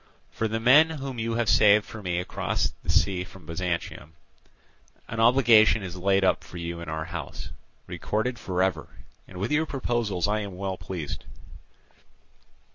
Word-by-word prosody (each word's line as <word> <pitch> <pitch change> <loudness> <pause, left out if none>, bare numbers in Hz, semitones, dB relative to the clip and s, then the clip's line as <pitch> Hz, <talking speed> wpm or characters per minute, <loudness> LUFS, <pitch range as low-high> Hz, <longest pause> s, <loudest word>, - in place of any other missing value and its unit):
For 110 - -2
the 110 +1 -2
men 140 +8 +6
whom 135 -6 -5
you 115 0 -2
have 120 -1 0
saved 105 0 +5
for 110 - -9
me 90 -3 -2
across 90 - -2
sea 90 -2 +2
from 90 -2 -14
Byzantium, 85 -2 -4 0.9
an 115 - -5
obligation 115 -3 +5
is 90 -1 -6
laid 95 +1 +2
up 95 - +2
for 90 - -11
you 85 0 -5
in 85 - -7
our 80 0 -3
house, 85 +1 -7 0.3
recorded 120 +3 -3
for 90 -1 -1
ever; 90 -5 -1 0.4
and 90 - -11
with 100 +8 -3
your 155 +2 +1
proposals 120 - -1
I 105 +1 0
am 100 -3 -6
well 95 0 -3
pleased. 85 -4 -6
100 Hz, 160 wpm, -26 LUFS, 90-115 Hz, 0.9 s, men